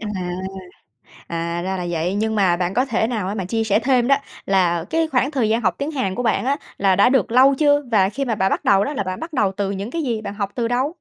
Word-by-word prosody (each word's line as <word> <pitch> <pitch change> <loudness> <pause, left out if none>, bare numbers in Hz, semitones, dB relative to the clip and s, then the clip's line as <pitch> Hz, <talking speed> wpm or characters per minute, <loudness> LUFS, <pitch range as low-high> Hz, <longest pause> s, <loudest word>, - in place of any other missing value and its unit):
À, 220 - -6 1.2
à, 170 +1 -3
ra 190 +1 -2
là 180 -1 -4
vậy. 175 +3 -1
Nhưng 220 +1 -1
mà 190 -5 +3
bạn 180 +1 -2
có 250 - +2
thể 230 -4 0
nào 220 -6 -2
á 200 - -3
mà 195 -3 -3
chia 225 +4 -1
sẻ 205 -1 +2
thêm 250 -1 +2
đó, 275 - +5 0.3
là 175 -4 +2
cái 325 0 +1
khoảng 270 -1 +1
thời 260 -7 0
gian 225 +2 +1
học 185 -6 +1
tiếng 285 +2 -2
Hàn 230 -11 -2
của 245 - -3
bạn 235 - +1
á, 280 +1 +2 0.2
là 195 -2 +3
đã 200 +5 +5
được 260 -2 +1
lâu 265 +2 +6
chưa? 290 0 +3
Và 195 -4 +4
khi 275 +7 -3
mà 235 -4 -1
bạn 190 -2 +1
bắt - - -1
đầu 200 0 +4
đó, 290 - -4
là 270 - -1
bạn 185 -1 -5
bắt 325 0 -7
đầu 210 -8 +1
từ 200 -1 -1
những 200 +3 -4
cái 335 +3 -3
gì, 235 -6 -2
bạn 210 - -6
học 200 -1 -3
từ 235 -2 -1
đâu? 245 +3 +1
220 Hz, 285 wpm, -21 LUFS, 190-255 Hz, 1.2 s, lâu